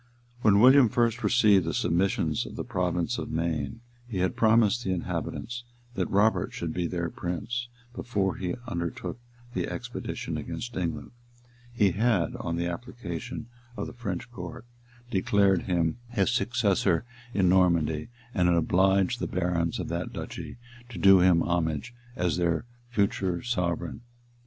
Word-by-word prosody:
[*] 120 0 -29
When 105 -3 +5
William 130 +1 +7
first 120 -1 +1
received 105 -6 +5
the 80 -2 -2
submissions 85 -3 +1
of - - -9
the - - -3
province 90 -2 -1
of - - -5
Maine, 80 +2 -2 0.3
he 110 -5 -4
had 90 0 0
promised 115 +1 +4
the 95 - -1
inhabitants 120 +6 -3 0.3
that - - -1
Robert 105 +3 +2
should 85 -2 -3
be 90 -1 -1
their 85 -1 -2
prince; 110 +8 -3 0.2
and 120 - -18
before 100 -6 -1
he 90 -2 -2
undertook 85 +4 -4 0.3
the - - -1
expedition 120 -1 -5
against 120 0 -5
England, 85 -3 -3 0.6
he 105 -5 +3
had, 105 -2 +1
on 85 -1 -3
the 85 +1 -1
application 90 - -5 0.3
of - - -2
the - - -8
French 120 -2 -5
court, 90 0 -8 0.5
declared 95 -1 +3
him 85 -2 +1
his 110 -2 +1
successor 120 -7 +1 0.3
in 95 -2 +3
Normandy, 85 -4 +3 0.3
and 90 -5 +2
had 85 -1 +4
obliged 95 +3 +3
the - - -2
barons 85 -2 0
of - - -3
that - - -3
duchy - - -7 0.3
to 115 - -8
do 95 +1 +7
him 90 -2 +5
homage 85 - -1 0.2
as 90 -3 0
their 85 +1 +1 0.2
future 100 -5 0
sovereign. 85 -8 -2
95 Hz, 150 wpm, -28 LUFS, 85-115 Hz, 0.6 s, William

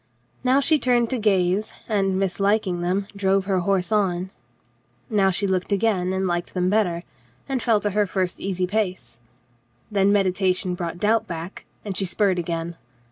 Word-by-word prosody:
Now 260 +2 +4
she 310 +2 +3
turned 240 -3 +2
to 255 - -1
gaze, 195 0 +1
and, 195 -3 +1
mislik 195 +3 +1
ing 175 -2 -2
them, 185 +3 0
drove 195 -1 +1
her 190 -2 +1
horse 185 +1 0
on. 190 -3 0 0.8
Now 200 -3 +3
she 190 +2 +1
looked 190 0 -1
again 195 -3 +1
and 190 0 -1
liked 175 0 -2
them 180 0 +1
better, 180 -6 +1 0.4
and 265 -3 -1
fell 225 -3 +3
to 205 - -1
her 210 +1 +1
first 185 -1 -2
easy 185 -2 -1
pace. 185 - -3 0.7
Then 200 -1 +3
meditation 185 -2 +1
brought 175 -1 -4
doubt 215 +4 +1
back, 170 +2 -7 0.2
and 200 -2 -4
she 195 - +1
spurred 190 0 +1
again. 165 0 -4
195 Hz, 170 wpm, -23 LUFS, 180-210 Hz, 0.8 s, Now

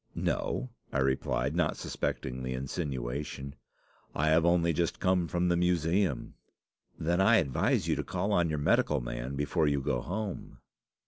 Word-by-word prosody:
"'No,' 125 -1 -1 0.2
I - - -1
replied, 65 0 0
not - - +1
suspecting 65 0 -3
the 65 0 -3
insinuation; 70 0 -4 0.6
'I 80 +2 +2
have 80 +1 +4
only 85 -1 +3
just 85 +1 -1
come 90 -2 +2
from 90 +1 0
the 85 - +3
Museum.' 85 -3 +1 0.6
"'Then 85 +3 +1
I 110 +4 +6
advise 70 - +1
you - - +2
to - - -1
call 95 +3 -2
on 85 -4 +3
your 75 - -1
medical 75 0 +2
man - - -4
before 75 +3 +1
you 70 -1 +2
go 65 -3 -1
home. 100 - -5
80 Hz, 155 wpm, -30 LUFS, 65-90 Hz, 0.6 s, I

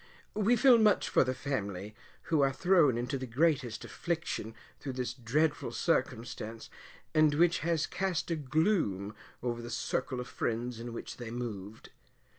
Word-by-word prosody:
We 215 +3 +3
feel 245 0 +6
much 215 -2 +4
for - - +5
the 130 0 -2
family, 105 -8 -3 0.3
who 160 -3 +2
are 135 -1 +4
thrown 165 -5 +4
into 125 +3 -2
the 130 - -5
greatest 130 -3 +1
affliction 160 -9 -3 0.2
through 135 - -5
this 125 -1 -2
dreadful 140 +5 0
circumstance, 115 -1 -2 0.4
and 155 -1 +4
which 170 +2 +4
has 165 -1 +1
cast 180 -3 -2
a - - +2
gloom 145 - 0 0.3
over 120 -1 -2
the 120 - -7
circle 125 +2 -2
of 125 - -5
friends 120 +1 -2
in 120 +1 -6
which 115 - -7
they 120 -2 -6
moved. 110 -3 -6
130 Hz, 155 wpm, -31 LUFS, 115-160 Hz, 0.4 s, feel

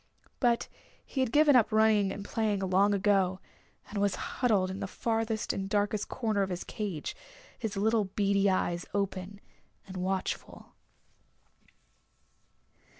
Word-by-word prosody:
But 240 -2 +2 0.4
he 270 - -5
had 260 -3 +1
given 295 0 +5
up 235 -4 +4
running 215 -2 +4
and 200 +1 -6
playing 210 -2 0
long 195 +3 +4
ago, 195 -2 +2 0.5
and 205 - -4
was 200 -1 +2
huddled 205 -7 0
in 190 - -6
the - - -3
farthest 225 +1 -1
and 195 0 -4
darkest 205 0 0
corner 220 -5 0
of 195 - 0
his 180 -1 -4
cage, 195 -8 -4 0.4
his 220 -4 -3
little 220 +1 +2
beady 200 0 +2
eyes 175 -2 0
open 200 0 -2 0.5
and 190 -1 -8
watchful. 185 +1 -3
205 Hz, 135 wpm, -30 LUFS, 195-220 Hz, 0.5 s, given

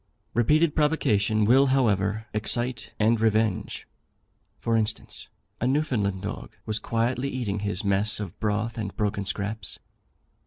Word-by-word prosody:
Repeated 150 +7 +3
provocation 110 -9 +2
will, 135 +5 +5
however, 110 -5 +2
excite 120 +3 -1
and 110 +1 +3
revenge. 110 -2 +1 0.7
For 115 - 0
instance, 110 -1 -2 0.3
a 125 - +1
Newfoundland 120 -10 0
dog 105 +2 -6
was 110 0 -1
quietly 120 +4 0
eating 115 -7 -2
his 100 -2 -1
mess 100 +2 +1
of 100 -5 -6
broth 110 +2 -1
and 100 -3 -5
broken 105 -1 -1
scraps. 100 +3 -3
110 Hz, 125 wpm, -26 LUFS, 105-120 Hz, 0.7 s, will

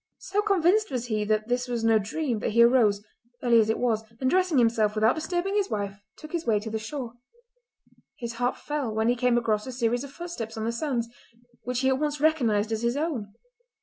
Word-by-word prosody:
So 400 +2 -1
convinced 405 +1 +2
was 250 -3 -3
he 215 -3 -1
that 215 0 0
this 245 +1 -1
was 240 -2 -2
no 225 -1 +4
dream 235 +3 -2
that 210 - -2
he 235 +1 +6
arose, 225 -5 +4 0.4
early 235 -2 +5
as 220 -1 +2
it 220 - +1
was, 225 -3 0 0.2
and 260 - 0
dressing 365 -5 +2
himself 225 -3 +3
without 220 +2 +4
disturbing 350 +4 -2
his 405 -1 +1
wife 200 -1 -3 0.2
took 310 - -11
his 340 -1 -2
way 215 -6 +2
to 220 +1 -6
the 220 - -2
shore. 235 +1 -6 1.0
His 235 -2 -5
heart 245 +1 +1
fell 295 -6 -3
when 220 +1 +1
he 245 - +3
came 245 0 +2
across 220 -1 0
a - - -4
series 240 0 0
of 280 - -8
footsteps 275 -10 -6
on 220 - -3
the 230 - 0
sands, 235 -1 -2 0.6
which 250 +1 -1
he 265 - +3
at 265 0 +1
once 300 -1 -1
recognised 235 -9 +2
as 220 0 -1
his 235 +3 0
own. 250 -10 -3
240 Hz, 220 wpm, -26 LUFS, 220-295 Hz, 1.0 s, he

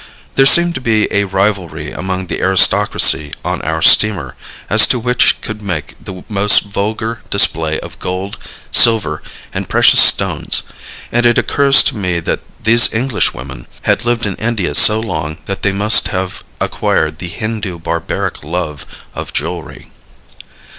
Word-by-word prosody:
There 135 0 +4
seemed 170 +3 +5
to - - -6
be 110 -3 +1
a 100 0 +1
rivalry 95 -6 -2
among 95 0 -5
the - - -5
aristocracy 95 -5 +2
on - - -3
our 80 0 -3
steamer 95 -12 +3 0.3
as - - +6
to - - +1
which 125 +1 +1
could 110 -1 -8
make 85 -8 -5
the 95 -1 -10
most 105 -2 +3
vulgar 110 +3 -4
display 80 -1 +1
of - - -12
gold, 95 +2 -6 0.3
silver 105 -10 +3 0.3
and - - -5
precious - - +4
stones, - - +3 0.5
and 120 +1 0
it 120 - +1
occurs 140 -1 +3
to - - -1
me 90 -5 -2
that 85 - -3 0.2
these 115 +2 +5
Englishwomen 70 - -3 0.2
had - - 0
lived 120 -1 -1
in 100 -3 -4
India 110 -5 -2
so 110 0 +6
long 80 -8 -5
that 100 - -6
they 100 - +1
must 105 +3 +3
have 95 0 -5 0.2
acquired 80 0 -2
the 90 - -5
Hindu 110 -3 -5
barbaric 85 -2 -4
love 75 -2 -5 0.3
of - - -8
jewelry. 85 +2 -6
100 Hz, 150 wpm, -14 LUFS, 85-110 Hz, 0.5 s, as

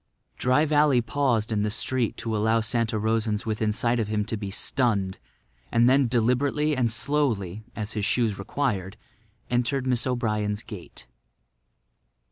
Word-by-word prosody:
Dry 130 +5 +3
Valley 150 -3 +4
paused 120 -2 0
in 105 -1 +1
the 105 - 0
street 120 +1 -1
to 115 -1 -3
allow 110 +2 +2
Santa 115 0 0
Rosans 110 0 0
within 110 -1 0
sight 120 +3 0
of 110 - -1
him 105 -1 -1
to 110 - -3
be 100 -2 -5
stunned; 100 -3 0 0.5
and 115 +1 +4
then 135 0 +4
deliberately 130 +6 +1
and 125 -3 +1
slowly, 110 -7 0
as 105 -1 -4
his 105 - -3
shoes 110 -1 +1
required, 100 -4 -2 0.5
entered 125 +2 +1
Mrs. 125 -1 +1
O'Brien's 105 -4 -1
gate. 90 - -10
115 Hz, 145 wpm, -26 LUFS, 105-125 Hz, 0.5 s, Valley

